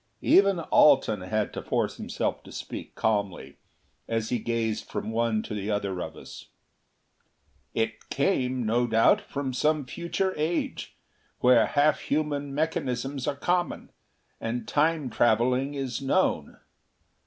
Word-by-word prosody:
Even 195 -2 +5
Alten 150 - +4
had 105 +3 -2
to - - -4
force - - -1
himself - - -3
to - - -14
speak - - -7
calmly, 100 -10 -1 0.5
as 115 -1 -1
he 120 - 0
gazed 115 -1 -2
from - - -4
one 115 -1 0
to - - -6
the 105 0 -3
other 100 -3 -1
of 80 -1 -6
us. - - -11 1.3
"It 110 -1 -2
came, 130 -5 0
no 120 +3 +2
doubt 115 0 +4
from 135 -2 -4
some 150 +2 +1
future 170 +6 -2
age, 160 +3 -2 0.5
where 125 -2 +5
half 145 +1 +3
human 145 -1 -1
mechanisms 140 -4 -2
are 140 - 0
common, 175 +4 -1 0.5
and 120 +2 -3
Time 155 -3 +1
traveling 125 +5 +2
is 135 -2 -3
known. 135 - 0
125 Hz, 130 wpm, -27 LUFS, 110-145 Hz, 1.3 s, Even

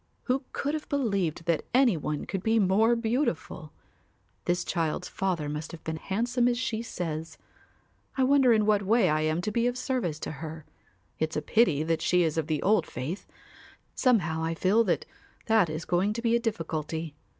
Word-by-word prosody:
Who 260 +1 -1
could 285 +2 -2
have 310 -1 -4
believed 200 - -1
that 170 -2 +1
any 255 -6 +5
one 150 -1 -3
could 195 - -3
be 225 +3 +2
more 215 +4 +4
beautiful? 230 - -2 0.7
This 175 0 +1
child's 165 -4 -2
father 180 -6 -2
must 150 +1 -5
have 170 - -10
been 160 0 -3
handsome 240 +8 0
as 240 -1 +1
she 230 -2 -2
says. 165 -7 -5 0.8
I 265 - +3
wonder 270 -1 +5
in 215 -2 +4
what 210 -1 +3
way 205 -1 +3
I 155 0 +1
am 155 +2 0
to 210 - -2
be 235 +2 +1
of 245 0 -1
service 250 - -1
to - - -4
her. 160 -1 -7 0.5
It's 160 0 -1
a - - 0
pity 175 -11 +3
that 160 0 0
she 180 +1 +3
is 160 -2 0
of 155 - -2
the 155 -3 -1
old 215 +3 +3
faith. 145 +11 -5 0.7
Somehow 175 - +2
I 165 0 -1
feel 200 +7 +3
that 180 - 0 0.4
that 220 -6 +3
is 155 +1 -4
going 185 +4 +1
to 235 - -4
be 230 0 +3
a - - +3
difficulty. 165 - -3
190 Hz, 190 wpm, -28 LUFS, 160-235 Hz, 0.8 s, any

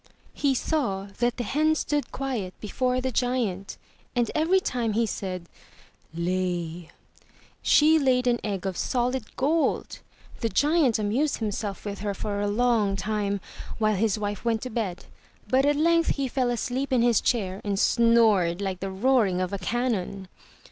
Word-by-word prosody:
He 275 -2 +1
saw 205 -10 -1
that 240 0 +1
the 245 - -2
hen 310 +7 +2
stood 295 -1 -1
quiet 245 -9 -3
before 250 +4 -1
the 260 0 -1
giant, 230 -6 -1 0.4
and 240 -1 +1
every 330 +5 +3
time 240 - -1
he 230 +2 +2
said 185 -4 -5 0.6
''Lay!'* 175 -1 -2 0.7
she 315 +1 +5
laid 255 -3 +2
an 240 -1 +2
egg 200 -3 -3
of 190 -2 -2
solid 250 -2 -1
gold. 305 +5 0 0.4
The 230 - 0
giant 290 -2 +3
amused 225 +8 0
himself 210 -2 -4
with 200 -1 -4
her 200 0 -3
for 205 -1 -3
a 205 - 0
long 215 -2 +2
time, 200 0 -1 0.4
while 215 -1 +2
his 215 +1 +1
wife 205 -1 -3
went 230 -2 0
to 255 - -5
bed. 200 -6 -3 0.4
But 265 +2 +3
at 290 - +3
length 335 +2 +3
he 275 -2 -1
fell 255 -1 0
asleep 250 +3 -2
in 245 -3 +3
his 240 -3 +4
chair 195 -5 -1
and 200 -1 -1
snored 220 -7 +4
like 190 -2 -3
the 195 - -3
roaring 200 -2 +2
of 185 +1 -2
a 200 - -2
cannon. 200 -3 -2
225 Hz, 160 wpm, -26 LUFS, 195-255 Hz, 0.7 s, she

